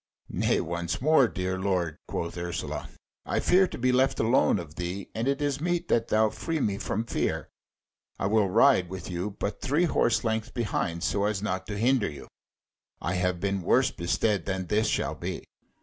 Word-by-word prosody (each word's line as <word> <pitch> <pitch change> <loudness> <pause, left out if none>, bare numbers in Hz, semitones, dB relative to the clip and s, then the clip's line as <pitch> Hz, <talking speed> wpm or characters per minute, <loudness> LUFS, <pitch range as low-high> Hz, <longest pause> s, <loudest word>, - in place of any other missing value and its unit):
"Nay - - +1
once 85 0 -3
more, 140 -2 +5
dear 95 -2 -3
lord," 90 -5 -1
quoth 85 - -3
Ursula, 85 0 -4 0.3
"I - - -1
fear 185 +1 +4
to - - -7
be 125 +1 +2
left 130 +2 +2
alone 115 -1 +3
of 85 -5 -7
thee, 90 +4 -5
and 115 +3 -2
it 140 +1 0
is 145 0 -1
meet 175 0 -1
that 115 0 +2
thou 110 0 +3
free 160 +9 -3
me 100 -6 0
from 110 +4 -2
fear. - - -2 0.7
I - - -2
will 105 -1 +3
ride 110 -3 +4
with 95 -1 -6
you, 90 +4 -3
but 100 - -3
three 145 +6 +2
horse 120 -7 +2
lengths 110 +1 -1
behind, 90 -8 -2
so 100 0 +1
as 105 -1 -1
not 95 -2 -2
to 105 -1 -4
hinder 120 0 +2
you. 70 -3 -10 0.7
I 85 - -2
have 90 -1 0
been 100 +1 -1
worse - - +3
bestead 95 +2 0
than 95 -1 -2
this 105 +4 +1
shall - - 0
be." - - -5
105 Hz, 190 wpm, -27 LUFS, 90-120 Hz, 0.7 s, more